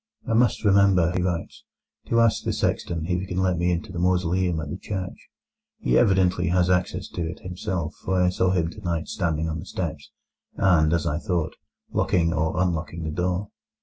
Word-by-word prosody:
"I 115 - 0
must 120 0 +2
remember," 100 -4 +4
he 90 - +1
writes, 90 -2 -3 0.4
"to 115 - +2
ask 115 -2 +3
the - - -1
sexton 80 -2 -1
if 90 +1 0
he 95 - -6
can 90 - -4
let 90 -2 +1
me 90 +1 +2
into 90 +4 -3
the 90 - -5
mausoleum 90 -1 +1
at 75 -2 -5
the 90 - -4
church. 95 -2 -6 0.5
He - - 0
evidently 95 -4 +3
has 90 +1 +2
access 90 0 0
to - - -5
it 85 - -8
himself, 90 -3 -3
for 95 -1 +1
I 90 0 +4
saw 90 0 +1
him 85 -3 +1
tonight 85 -3 -3
standing 80 -3 -1
on 80 0 -3
the 80 - -8
steps, 80 -5 -4 0.5
and, 85 -5 +4
as 85 -1 +1
I 80 -1 0
thought, 85 -4 -2 0.4
locking 85 -2 +1
or 80 +1 0
unlocking 85 -2 -1
the 80 - -3
door." 90 +4 -1
90 Hz, 195 wpm, -25 LUFS, 85-95 Hz, 0.5 s, remember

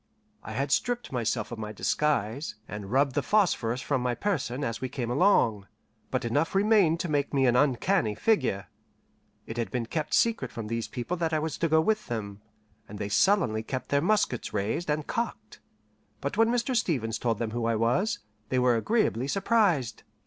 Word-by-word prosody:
I - - -8
had 135 +1 -2
stripped 245 - 0
myself 115 -3 -1
of 120 - -6
my 105 -1 -5
disguise, 135 +2 -1
and 105 -1 -7
rubbed 135 +1 +2
the 145 - +1
phosphorus 130 - +1
from 140 -3 -1
my 125 -1 0
person 145 - -2
as 115 -3 -3
we 130 - -2
came 120 -2 -3
along, 120 - +3 0.4
but 130 -1 -1
enough 145 +10 0
remained 195 -5 +4
to 175 - -2
make 145 -2 -1
me 135 -1 +3
an 120 -1 +3
uncanny 135 - +2
figure. 130 - +1 0.8
It 115 - -7
had 115 - -1
been 125 -2 -2
kept 155 +6 -2
secret 230 -1 +1
from 115 - -6
these 115 0 -2
people 125 +9 -4
that 165 -1 -1
I - - +3
was 155 -1 -2
to 165 - +1
go 160 +1 +5
with 215 +5 0
them, 105 -4 -5 0.5
and 105 - -8
they 100 0 -4
sullenly 145 - +3
kept 130 +3 -5
their 140 0 +2
muskets 180 - +1
raised 110 - -1
and 150 0 0
cocked; 230 - -4 0.6
but 140 - -3
when 225 +2 +4
Mr. 245 +2 0
Stevens 125 - 0
told 115 -3 0
them 115 -1 -3
who 120 0 -2
I 115 0 +1
was, 120 - +1 0.3
they 130 - 0
were 125 -1 +4
agreeably 135 - +1
surprised. 195 - +1
135 Hz, 190 wpm, -28 LUFS, 115-175 Hz, 0.8 s, go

